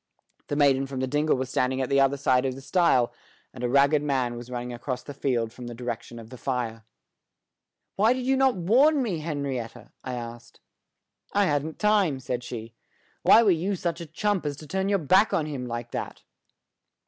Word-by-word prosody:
The 145 Hz, -, -2 dB
maiden 135 Hz, -2 st, +3 dB
from 135 Hz, -1 st, -5 dB
the 130 Hz, -, 0 dB
dingle 150 Hz, +2 st, +1 dB
was 130 Hz, 0 st, -4 dB
standing 130 Hz, 0 st, 0 dB
at 130 Hz, -, 0 dB
the 140 Hz, +1 st, +2 dB
other 135 Hz, +1 st, +3 dB
side 130 Hz, -2 st, +2 dB
of 130 Hz, -, -3 dB
the 135 Hz, -, -9 dB
stile, 135 Hz, -6 st, +2 dB, 0.4 s
and 125 Hz, -, -8 dB
a 120 Hz, -, 0 dB
ragged 140 Hz, +3 st, +4 dB
man 130 Hz, -5 st, 0 dB
was 120 Hz, +1 st, -9 dB
running 125 Hz, 0 st, -5 dB
across 125 Hz, +1 st, -4 dB
the 145 Hz, -, -8 dB
field 120 Hz, -5 st, -1 dB
from 125 Hz, -1 st, -9 dB
the 120 Hz, -, -7 dB
direction 120 Hz, 0 st, -6 dB
of 115 Hz, -1 st, -11 dB
the 125 Hz, -, -10 dB
fire. 120 Hz, -4 st, -3 dB, 1.1 s
"Why 220 Hz, +5 st, +4 dB
did 255 Hz, -1 st, -4 dB
you 270 Hz, +1 st, +3 dB
not 265 Hz, -1 st, +3 dB
warn 260 Hz, -, +4 dB
me, 190 Hz, -9 st, -2 dB
Henrietta?" 135 Hz, -7 st, -4 dB
I 130 Hz, -1 st, -4 dB
asked. 120 Hz, 0 st, -9 dB, 0.7 s
"I 205 Hz, 0 st, +3 dB
hadn't 150 Hz, -1 st, -1 dB
time," 205 Hz, -10 st, +2 dB
said 125 Hz, -1 st, -4 dB
she. 115 Hz, -2 st, -7 dB, 0.5 s
"Why 230 Hz, -, +7 dB
were 205 Hz, -, +5 dB
you 180 Hz, +4 st, 0 dB
such 170 Hz, -1 st, -3 dB
a 170 Hz, -, -7 dB
chump 205 Hz, +4 st, -1 dB
as 145 Hz, -2 st, -3 dB
to 155 Hz, -, -11 dB
turn 190 Hz, +4 st, -1 dB
your 200 Hz, -, +3 dB
back 190 Hz, +6 st, +3 dB
on 155 Hz, -, +1 dB
him 135 Hz, -5 st, -5 dB
like 120 Hz, 0 st, -5 dB
that?" -, -, -5 dB
140 Hz, 205 wpm, -26 LUFS, 125-170 Hz, 1.1 s, Why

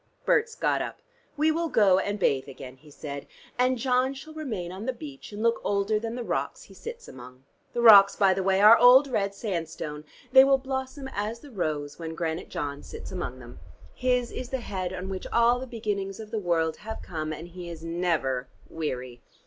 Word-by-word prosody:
Berts 455 Hz, -2 st, +2 dB
got -, -, +1 dB
up. -, -, -5 dB, 0.4 s
"We 310 Hz, +2 st, +3 dB
will 330 Hz, +1 st, -1 dB
go 195 Hz, -7 st, +4 dB
and 205 Hz, +1 st, -2 dB
bathe 135 Hz, -8 st, +1 dB
again," 130 Hz, -1 st, -10 dB
he 150 Hz, +3 st, -18 dB
said, 140 Hz, -1 st, -7 dB, 0.3 s
"and 255 Hz, +1 st, +3 dB
John 255 Hz, +2 st, +1 dB
shall 310 Hz, +4 st, -10 dB
remain 220 Hz, -, -4 dB
on 195 Hz, +6 st, -7 dB
the 260 Hz, -, 0 dB
beach 275 Hz, -1 st, -10 dB
and 210 Hz, +1 st, -5 dB
look 230 Hz, 0 st, +2 dB
older 205 Hz, +1 st, +1 dB
than 225 Hz, +1 st, -4 dB
the 245 Hz, -, -4 dB
rocks -, -, -3 dB
he -, -, -16 dB
sits 470 Hz, +1 st, -9 dB
among. 125 Hz, +1 st, -12 dB, 0.3 s
The 240 Hz, -, -1 dB
rocks 200 Hz, -3 st, +9 dB
by 195 Hz, -2 st, +4 dB
the 190 Hz, -, -2 dB
way 190 Hz, +1 st, +2 dB
are 215 Hz, +2 st, +10 dB
old 255 Hz, +4 st, +7 dB
red 200 Hz, -6 st, -1 dB
sandstone. 165 Hz, -7 st, -4 dB, 0.3 s
They 265 Hz, 0 st, +9 dB
will 270 Hz, 0 st, +4 dB
blossom 265 Hz, +1 st, -5 dB
as 215 Hz, +3 st, -3 dB
the 290 Hz, -, -13 dB
rose 150 Hz, -8 st, -3 dB
when 160 Hz, -1 st, -5 dB
Granite 165 Hz, +1 st, -3 dB
John 145 Hz, -1 st, -4 dB
sits -, -, -9 dB
among 175 Hz, -9 st, -4 dB
them. 120 Hz, -9 st, -12 dB, 0.3 s
His 250 Hz, -1 st, 0 dB
is 250 Hz, -, -6 dB
the 265 Hz, -1 st, -3 dB
head 185 Hz, -5 st, -4 dB
on 185 Hz, 0 st, -5 dB
which 190 Hz, -1 st, -5 dB
all 235 Hz, +1 st, +4 dB
the 260 Hz, -, -6 dB
beginnings 205 Hz, -4 st, -3 dB
of 215 Hz, -1 st, -9 dB
the 225 Hz, -, -1 dB
world 165 Hz, -4 st, 0 dB
have 220 Hz, +1 st, -7 dB
come, 155 Hz, -3 st, -4 dB
and 160 Hz, +3 st, -7 dB
he 175 Hz, 0 st, -8 dB
is 165 Hz, -1 st, -8 dB
never 165 Hz, -7 st, -1 dB, 0.2 s
weary. 125 Hz, -6 st, -5 dB
200 Hz, 205 wpm, -27 LUFS, 160-250 Hz, 0.4 s, are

